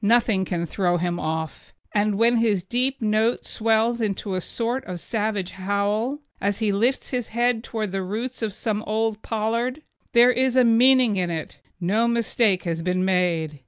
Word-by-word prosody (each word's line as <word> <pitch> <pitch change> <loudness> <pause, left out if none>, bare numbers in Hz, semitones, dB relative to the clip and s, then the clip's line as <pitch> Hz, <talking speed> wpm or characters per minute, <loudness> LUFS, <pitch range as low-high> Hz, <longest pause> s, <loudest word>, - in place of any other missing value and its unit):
Nothing 215 -3 +3
can 170 -2 -2
throw 175 0 0
him 175 0 -2
off 160 0 -4 0.2
it, 210 - +2
and 205 -1 +1
when 235 +2 +4
his 215 -5 +1
deep 250 +5 -1
note 220 +2 +1
swells 225 +1 +1
into 200 -2 -2
a 185 - -1
sort 240 +7 -2
of 180 -1 -6
savage 210 -2 -2
howl, 205 +8 -1 0.2
as 200 0 0
he 220 -2 0
lifts 235 +7 0
his 245 -3 -2
head 240 0 0
towards 215 -5 -4
the 195 0 -2
roots 225 +8 -4
of 220 -2 -1
some 210 +1 -2
old 220 0 -1
pollard, 230 +6 -2 0.3
there 240 +1 +7
is 255 +1 +1
a 255 - +6
meaning 240 -1 +4
in 180 -2 0
it 160 -2 -5 0.2
no 210 +6 +1
mistake 230 -4 +1
has 165 -2 -2
been 185 +2 0
made. 170 -5 0
215 Hz, 180 wpm, -23 LUFS, 185-235 Hz, 0.3 s, there